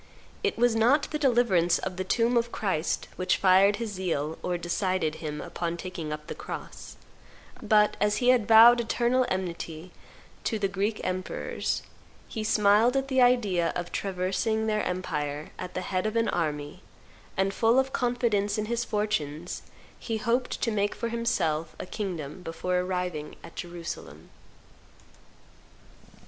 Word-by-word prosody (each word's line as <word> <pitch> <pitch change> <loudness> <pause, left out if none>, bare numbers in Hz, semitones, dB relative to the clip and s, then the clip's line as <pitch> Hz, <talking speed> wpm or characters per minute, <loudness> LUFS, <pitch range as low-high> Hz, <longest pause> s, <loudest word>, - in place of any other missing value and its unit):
It 415 - 0
was 240 -1 +3
not 250 +6 +4
the 300 - -2
deliverance 235 - +3
of 185 -1 -4
the 185 - -2
tomb 230 +5 +1
of 235 0 +1
Christ 185 -6 -1
which 185 - +1
fired 195 +2 +5
his 230 -1 -4
zeal 165 -5 -2
or 180 -1 -1
decided 175 -2 -1
him 150 -2 -4
upon 170 +1 -4
taking 175 -4 -6
up 150 0 -5
the - - -5
cross; - - -8 0.7
but, 210 -1 +3
as 210 0 +2
he 250 -1 +2
had 245 -5 +4
vowed 230 +2 +8
eternal 245 +2 +1
enmity 175 -2 -4 0.5
to 220 - 0
the 200 -2 0
Greek 200 +3 -2
emperors, 185 0 -2 0.4
he 220 - -4
smiled 215 +3 +4
at 270 0 -1
the 260 -1 +3
idea 210 -9 +3
of 175 0 -4
traversing 195 +4 -1
their 215 -1 0
empire 150 -5 -3
at 180 - -6
the 185 - -1
head 185 +2 -1
of 215 - -3
an 230 0 +2
army, 150 0 -2 0.6
and, 195 +1 +1
full 230 +4 +3
of 265 0 +2
confidence 230 -5 +1
in 215 - -1
his 235 +2 -1
fortunes, 175 -8 -2 0.4
he 225 -2 -3
hoped 240 +3 0
to 230 - +1
make 205 -1 0
for 235 - -3
himself 170 -9 -1
a - - -4
kingdom 180 -6 -5
before 180 +2 -2
arriving 180 -4 -3
at - - -12
Jerusalem." 175 -1 -7
195 Hz, 155 wpm, -27 LUFS, 175-230 Hz, 0.7 s, vowed